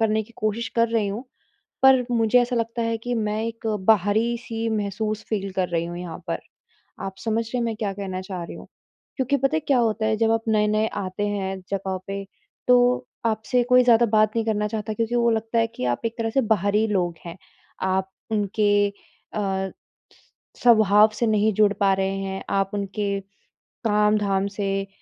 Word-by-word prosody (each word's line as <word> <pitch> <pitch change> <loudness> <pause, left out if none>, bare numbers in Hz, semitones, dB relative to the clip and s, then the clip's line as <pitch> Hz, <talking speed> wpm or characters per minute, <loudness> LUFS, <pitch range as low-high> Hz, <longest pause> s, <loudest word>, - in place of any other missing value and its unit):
करने 220 -1 +2
की 235 +2 -17
कोशिश 215 +2 -1
कर 230 0 +4
रहीं 220 -3 0
हूँ, 220 +6 -5 0.6
पर 260 -2 +6
मुझे 230 +1 +4
ऐसा 245 0 -1
लगता 230 0 -1
है 230 0 0
कि 245 +2 -4
मैं 215 -1 -1
एक 230 0 -5 0.2
बाहरी-सी 225 +3 +1
महसूस 215 0 -2
फ़ील 200 -3 -2
कर 185 -1 0
रही 170 -1 -1
हूँ 175 0 -6
यहाँ 175 -2 -6
पर। 165 - -2 0.7
आप 190 0 -5
समझ 225 0 0
रहे 235 +3 -4
हैं 240 - 0
मैं 225 - -2
क्या 210 -3 -2
कहना 190 -2 -5
चाह 185 -2 -6
रही 170 - -8
हूँ? - - -11 0.5
क्योंकि 270 +1 +1
पता 270 +3 +1
है - - +2
क्या 280 -3 +1
होता 220 -1 +1
है 220 0 +2
जब 225 0 +2
आप 225 0 +2
नए-नए 215 0 +2
आते 195 0 -3
हैं 195 -2 -2
जगहों 190 -1 -2
पे, 195 0 -4 0.4
तो 245 0 +4 0.2
आपसे 225 +2 +1
कोई 250 0 +6
ज़्यादा 235 -1 +5
बात 215 -1 +3
नहीं 225 -1 0
करना 210 -1 0
चाहता 215 0 -3
क्योंकि 230 +2 -1
वो 235 -1 +3
लगता 225 +1 0
है 225 - +2
कि, 125 - -6
आप 120 -1 0
एक 230 0 -2
तरह 225 -1 -1
से 270 - +2
बाहरी 210 -1 +2
लोग 180 -5 0
हैं, 170 +1 -7 0.4
आप 190 0 0 0.2
उनके 205 -1 +2
अ, 195 -1 -5 0.9
स्वभाव 215 -3 +6
से 230 +2 0
नहीं 215 0 +2
जुड़ 210 0 +4
पा 195 -1 +4
रहे 195 0 0
हैं, 195 0 -4
आप 195 0 0
उनके 200 0 -2 0.7
काम-धाम 210 -2 +2
से, 195 -1 -2
215 Hz, 190 wpm, -24 LUFS, 195-230 Hz, 0.9 s, पर